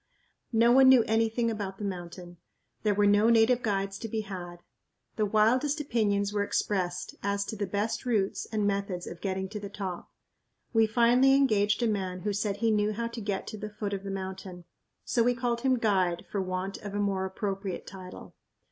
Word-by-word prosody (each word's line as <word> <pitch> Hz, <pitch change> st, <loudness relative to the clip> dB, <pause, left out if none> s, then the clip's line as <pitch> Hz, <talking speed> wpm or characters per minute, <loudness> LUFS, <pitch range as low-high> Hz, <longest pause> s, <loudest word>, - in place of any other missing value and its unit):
No 230 Hz, 0 st, +4 dB
one 260 Hz, +1 st, +7 dB
knew 255 Hz, -3 st, +7 dB
anything 225 Hz, +1 st, +1 dB
about 200 Hz, -3 st, -5 dB
the 210 Hz, -, -7 dB
mountain. 175 Hz, -2 st, -6 dB, 0.4 s
There 210 Hz, -2 st, +1 dB
were 205 Hz, 0 st, +3 dB
no 205 Hz, +2 st, +5 dB
native 235 Hz, +2 st, +4 dB
guides 195 Hz, -3 st, -1 dB
to 225 Hz, -, -5 dB
be 220 Hz, 0 st, -2 dB
had. 175 Hz, -4 st, -8 dB, 0.5 s
The 215 Hz, -2 st, +1 dB
wildest 250 Hz, +9 st, +2 dB
opinions 205 Hz, -7 st, 0 dB
were 205 Hz, -, +1 dB
expressed 180 Hz, -3 st, -2 dB
as 200 Hz, 0 st, -1 dB
to -, -, -5 dB
the 205 Hz, -1 st, -3 dB
best 205 Hz, +4 st, -2 dB
routes 215 Hz, -6 st, 0 dB
and 215 Hz, -2 st, 0 dB
methods 200 Hz, -3 st, -1 dB
of 170 Hz, -, -9 dB
getting 190 Hz, -1 st, -2 dB
to 210 Hz, +1 st, -5 dB
the 200 Hz, -1 st, -7 dB
top. 190 Hz, -3 st, -6 dB, 0.6 s
We 225 Hz, -1 st, +4 dB
finally 245 Hz, +4 st, +4 dB
engaged 215 Hz, -5 st, +2 dB
a -, -, +3 dB
man 190 Hz, -4 st, -2 dB
who 205 Hz, +1 st, -1 dB
said 205 Hz, 0 st, -1 dB
he 225 Hz, +1 st, +1 dB
knew 210 Hz, 0 st, +1 dB
how 230 Hz, +2 st, -3 dB
to 230 Hz, 0 st, -7 dB
get 200 Hz, -2 st, -3 dB
to 215 Hz, -, -7 dB
the 210 Hz, -, -5 dB
foot 210 Hz, -1 st, -4 dB
of 195 Hz, -1 st, -4 dB
the 200 Hz, -, -5 dB
mountain, 190 Hz, -2 st, -6 dB, 0.4 s
so 235 Hz, -, +1 dB
we 245 Hz, +1 st, +3 dB
called 235 Hz, -1 st, -1 dB
him 260 Hz, 0 st, +2 dB
"guide" 190 Hz, -6 st, +1 dB
for 200 Hz, -, -1 dB
want 185 Hz, +1 st, -3 dB
of 205 Hz, -1 st, -7 dB
a -, -, -1 dB
more 195 Hz, -2 st, 0 dB
appropriate 195 Hz, 0 st, -4 dB
title. 185 Hz, -1 st, -10 dB
205 Hz, 200 wpm, -28 LUFS, 195-225 Hz, 0.6 s, one